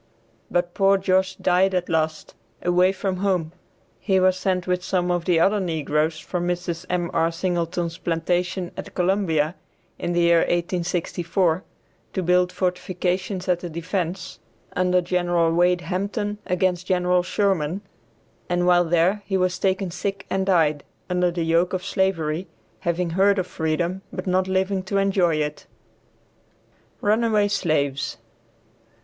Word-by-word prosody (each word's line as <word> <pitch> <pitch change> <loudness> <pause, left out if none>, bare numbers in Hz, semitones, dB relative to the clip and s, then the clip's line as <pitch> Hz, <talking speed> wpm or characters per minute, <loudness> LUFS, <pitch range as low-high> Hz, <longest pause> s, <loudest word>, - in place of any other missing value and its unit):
But 175 0 0
poor 195 0 +4
Josh 190 0 +1
died 185 +1 +2
at 180 -1 0
last, 155 -1 -1 0.3
away 180 +1 +4
from 190 -1 -2
home; 180 -4 0 0.5
he 190 -2 +2
was 185 0 +4
sent 185 -1 -1
with 180 0 -1
some 180 -2 0
of 175 -1 -1
the 175 -3 +3
other 200 +5 +3
negroes 155 -3 0
from 175 +2 -3
Mrs. 175 0 -3
M.R. 170 -2 0
Singleton's 170 -1 -2
plantation 175 +2 -1
at - - -8
Columbia, 175 -4 +1 0.5
in 175 - -2
the 175 - +2
year 170 0 +5
1864, 175 0 0 0.5
to 190 - -1
build 180 +1 +3
fortifications 180 +1 -2
as 180 -1 +1
a 175 - -4
defence, 175 +2 -4 0.4
under 180 0 +3
Gen. 175 -2 +1
Wade 175 +1 +3
Hampton 200 +4 -3
against 180 -1 0
Gen. 180 -1 +2
Sherman, 185 -2 0 0.7
and 175 0 +1
while 175 0 +5
there 175 +5 +2
he 195 - +1
was 185 -1 0
taken 190 -1 0
sick 195 +2 -4
and 190 0 0
died, 155 -6 +3 0.3
under 180 0 +2
the 170 -1 -2
yoke 165 +3 +2
of 185 0 -2
slavery, 185 -3 0 0.3
having 170 0 -1
heard 195 +3 +3
of 185 - 0
freedom 170 +2 -2
but - - -5
not 185 0 +1
living 190 +1 0
to 190 +2 -2
enjoy 190 -4 +2
it. 150 -1 -3 1.3
RUNAWAY 215 -1 +2
SLAVES. 145 -8 0
180 Hz, 140 wpm, -23 LUFS, 170-190 Hz, 1.3 s, year